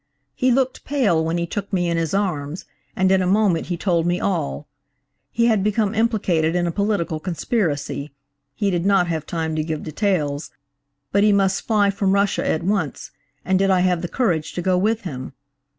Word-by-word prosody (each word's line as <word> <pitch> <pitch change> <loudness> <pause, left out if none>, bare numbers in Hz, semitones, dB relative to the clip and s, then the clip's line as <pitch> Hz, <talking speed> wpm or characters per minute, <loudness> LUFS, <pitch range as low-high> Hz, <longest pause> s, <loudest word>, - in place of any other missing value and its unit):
"He 255 - +1
looked 260 +1 0
pale 225 - +1
when 165 +2 -1
he 170 - -1
took 200 +3 -5
me 180 -3 +1
in 170 - 0
his 165 -2 -1
arms, 175 -5 -2 0.3
and 190 0 +2
in 190 -1 +4
a 180 - 0
moment 195 -3 +2
he 175 - -2
told 170 -2 +1
me 175 +1 +1
all.–He 140 - -4
had 220 -5 +3
become 210 0 +1
implicated 195 -8 +1
in 175 -1 +1
a 170 - 0
political 200 -5 -1
conspiracy–he 145 - -3
did 175 -2 0
not 195 -2 +3
have 160 -2 -3
time 160 -2 -2
to 155 - 0
give 155 -1 -4
details–but 145 -2 -3
he 210 - +5
must 195 -1 +1
fly 205 -3 +3
from 195 -1 0
Russia 200 0 +1
at 160 - 0
once, 185 -5 -2 0.3
and 185 +1 +2
did 195 0 +2
I 185 -1 +3
have 180 -2 +1
the 175 - -3
courage 170 -9 -1
to 175 - -3
go 185 0 +2
with 215 +5 +1
him? 135 - -6
180 Hz, 185 wpm, -21 LUFS, 155-200 Hz, 0.3 s, he